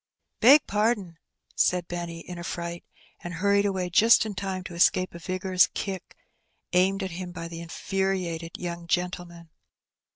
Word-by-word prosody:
''Beg 280 +6 +8
pardon," 205 -5 0 0.4
said 180 -1 +2
Benny, 170 -1 -5
in 175 0 -8
a - - -6
fright, 170 0 -5 0.4
and 175 0 -7
hurried 200 +3 +2
away 190 -2 -1
just 225 +5 +6
in 215 - -4
time 190 -1 -4
to 180 - -8
escape 185 +2 +3
a 170 - -8
vigorous 185 0 +2
kick 190 -3 -5 0.6
aimed 190 +2 +3
at 190 - -4
him 180 +1 -6
by 165 -1 -6
the 170 0 -7
infuriated 175 -1 -2
young 170 -1 -5
gentleman. 175 -2 -3
180 Hz, 155 wpm, -26 LUFS, 170-195 Hz, 0.6 s, Beg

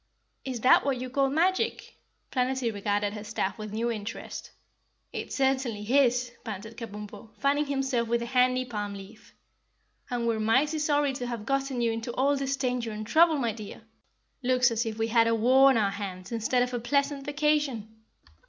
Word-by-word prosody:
"Is 255 -4 -4
that 255 - +6
what 275 -3 0
you 255 0 -5
call 275 0 +2
the 275 - -4
magic?" 375 +7 0 0.4
Planetty 255 -2 0
regarded 205 0 -1
her 210 -1 -6
staff 210 -1 -3
with 215 -1 -6
new 230 +3 -1
interest. 215 0 -6 0.6
"It - - -5
certainly 265 -5 0
is!" 250 0 +2
panted 220 0 -7
Kabumpo, 210 -2 -8
fanning 285 +1 +1
himself 270 -4 0
with 235 +1 0
a - - -3
handy 255 +1 +2
palm 205 -4 -4
leaf. 200 +2 -13 0.7
"And 240 -1 -2
we're 230 -1 +1
mighty 265 +8 +2
sorry 290 -2 +1
to 250 -2 -4
have 235 -3 -5
gotten 275 -2 -1
you 230 -1 +2
into 225 +2 -4
all 275 +3 +2
this 275 0 -1
danger 250 -3 -1
and 215 0 -5
trouble, 320 +7 +5
my 240 -4 0
dear. 215 0 -9 0.6
Looks 255 -1 +3
as 230 +1 -1
if 220 -1 -4
we 225 0 -1
had 230 0 +4
a 230 - +3
war 260 +4 +6
on 265 - +3
our 205 -3 +2
hands 195 -2 -6
instead 235 +2 +1
of 250 0 -4
a 245 - -1
pleasant 280 +3 0
vacation." 285 -7 0
245 Hz, 185 wpm, -28 LUFS, 220-270 Hz, 0.7 s, that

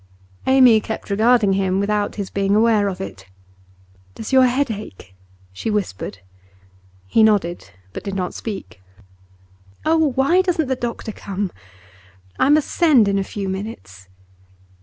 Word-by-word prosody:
Amy 255 -4 +6
kept 220 -1 -6
regarding 220 -1 +3
him, 190 -1 0
without 205 0 -1
his 200 -2 -5
being 200 0 +1
aware 215 -2 +3
of 190 -2 -4
it. 95 -1 -8 0.9
'Does 225 - -7
your 260 -1 +6
head 255 +1 0
ache?' 150 - -9 0.4
she 160 - -4
whispered. 175 - -3 0.8
He 95 - +2
nodded, 200 - +1 0.2
but - - -7
did 200 -1 -5
not 185 -2 -3
speak. 200 - -7 1.0
'Oh, 315 -3 +2
why 280 +8 +3
doesn't 345 -5 0
the 260 - +1
doctor 235 -2 -5
come? 200 -2 -4 0.9
I - - +3
must 300 0 +3
send 290 - +4
in 200 0 +1
a - - 0
few 195 0 -5
minutes. 100 - -7
210 Hz, 140 wpm, -20 LUFS, 195-250 Hz, 1.0 s, Amy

